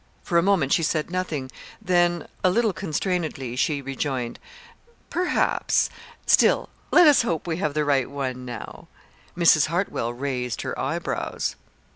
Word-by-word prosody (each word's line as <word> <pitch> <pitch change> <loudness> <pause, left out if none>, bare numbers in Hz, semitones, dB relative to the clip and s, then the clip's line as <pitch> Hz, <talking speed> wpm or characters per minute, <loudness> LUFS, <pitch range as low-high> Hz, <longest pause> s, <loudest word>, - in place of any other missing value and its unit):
For 170 -2 +2
a - - +3
moment 175 -7 +2
she - - +3
said 155 +1 -1
nothing, 155 -8 -3 0.3
then, 175 -4 +1 0.2
a 185 - +5
little 220 +2 +2
constrainedly, 160 -8 -2
she 140 +2 0
rejoined: 135 -3 -3 0.7
"Perhaps. 360 +1 +1 0.3
Still - - +4 0.2
let 355 - +7
us 295 -3 +6
hope 170 -9 -2
we 165 -2 -2
have 150 -5 -2
the 150 -1 +1
right 135 -3 +1
one, 130 -2 -4
now." 125 -1 -8 0.5
Mrs. 165 -4 +5
Hartwell 170 -8 -1
raised 125 -2 -3
her - - -3
eyebrows. - - -2
155 Hz, 140 wpm, -24 LUFS, 135-180 Hz, 0.7 s, let